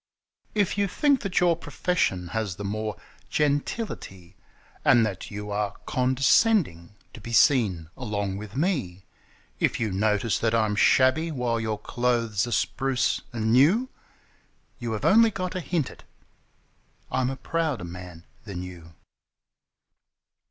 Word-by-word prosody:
If 205 -1 +1
you 200 - +2
think 280 +7 +2
that 195 -4 0
your 175 -1 +4
profession 145 - -1
has 110 -2 -2
the 100 - -7
more 105 +1 -3 0.3
gentility, 145 - -2 0.5
And 115 -2 +5
that 100 -4 -5
you 105 0 -6
are 105 0 -2
condescending 130 - +2 0.2
to 110 - -11
be 115 - -8
seen 105 - +3
along 100 -6 -3
with 105 +1 -9
me; 130 - -1 0.5
If - - +1
you 110 -3 -1
notice 105 +2 +1
that 115 0 +1
I'm 110 -2 +1
shabby 130 +9 +4
while 125 -6 -1
your 110 -1 -2
clothes 115 -1 0
are - - -5
spruce 135 +1 0
and 110 -1 0
new 180 - +4 0.5
— - - -39
You 120 -2 -3
have 105 - -3
only 225 +3 +6
got 185 -3 -4
to 185 - -3
hint 170 -4 -2
it: - - -16 1.1
I'm 130 -1 +1
a 135 - -3
prouder 155 - -2
man 85 -1 -10 0.2
than 95 -4 -6
you! 85 -3 -11
115 Hz, 140 wpm, -26 LUFS, 100-150 Hz, 1.1 s, only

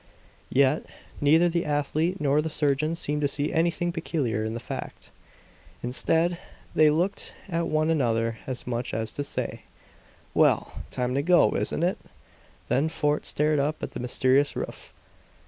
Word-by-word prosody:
Yet, 140 +2 +2 0.3
neither 160 +4 +5
the 170 0 0
athlete 155 +5 0
nor 145 +1 +2
the 160 - -3
surgeon 150 +1 +1
seemed 150 -2 -1
to 145 - +3
see 145 +1 -1
anything 170 +1 +1
peculiar 145 -10 -2
in 110 +1 -3
the - - -3
fact. - - -7 0.7
Instead, 165 +7 +1 0.3
they 155 -1 +5
looked 175 +6 -1
at 170 -2 -1
one 155 +1 +1
another 115 -6 0
as 130 -2 -4
much 120 0 -3
as 110 0 -3
to 145 - -3
say, 140 - -3 0.7
"Well, - - +3 0.2
time 125 0 -2
to 140 - +1
go, 175 +4 +5
isn't 165 - 0
it?" 180 +2 +1 0.7
Then 145 +5 +1
Fort 150 -2 0
stared 150 0 +1
up 150 +2 -1
at - - -3
the - - -6
mysterious 130 +3 +2
roof. - - -6
150 Hz, 155 wpm, -26 LUFS, 130-165 Hz, 0.7 s, neither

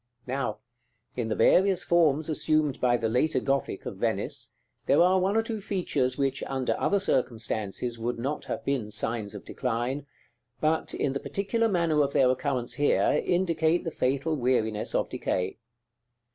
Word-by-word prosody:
Now, 130 +1 -2 0.6
in 120 -3 -2
the 110 - -1
various 190 -1 +4
forms 160 -3 +3
assumed 155 -2 0
by 120 -1 +3
the 115 - -1
later 130 +6 +1
Gothic 135 +2 -1
of - - -6
Venice, - - -2 0.3
there 140 - +4
are 185 +2 +5
one 195 +4 +1
or 225 - +3
two 225 -2 -4
features 175 - -1
which, 135 -1 0
under 130 -2 -1
other 200 - +2
circumstances, 115 - -1
would 120 +2 -2
not 135 +6 -3
have - - -5
been 130 -6 -1
signs 110 -1 -3
of 100 - -9
decline; 130 +3 -2 0.5
but, 155 +1 0
in 135 - 0
the 140 - -2
particular 225 +7 0
manner 170 -5 +2
of 140 -1 0
their 130 -1 +4
occurrence 130 -2 -2
here, 145 0 +2
indicate 170 -2 +1
the 165 - -3
fatal 140 +4 0
weariness 120 -5 0
of - - +1
decay. 90 +3 -2
140 Hz, 160 wpm, -27 LUFS, 120-165 Hz, 0.6 s, are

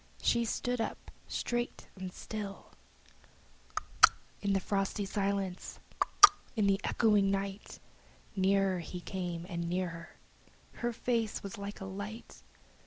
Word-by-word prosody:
She 235 0 +3
stood 245 +2 -1
up - - -4 0.2
straight 240 0 -2
and 185 -1 -6
still. 205 0 -6
Tlot - - -13 0.2
tlot, - - +11 0.3
in 200 -1 +1
the 195 - +3
frosty 195 +1 -1
silence! 195 -2 -2 0.2
Tlot - - -2
tlot, 410 - +12 0.2
in 215 -3 +2
the 195 0 +3
echoing 210 -3 +3
night! 195 +1 -3 0.6
Nearer 195 -1 +3
he 175 +2 -6
came 175 -2 -4
and 170 -2 -3
nearer! 170 -2 -3 0.7
Her 240 0 +1
face 230 -2 -1
was 200 +2 -6
like 200 +1 -6
a - - -4
light! 205 +4 -7
195 Hz, 135 wpm, -32 LUFS, 190-215 Hz, 0.7 s, tlot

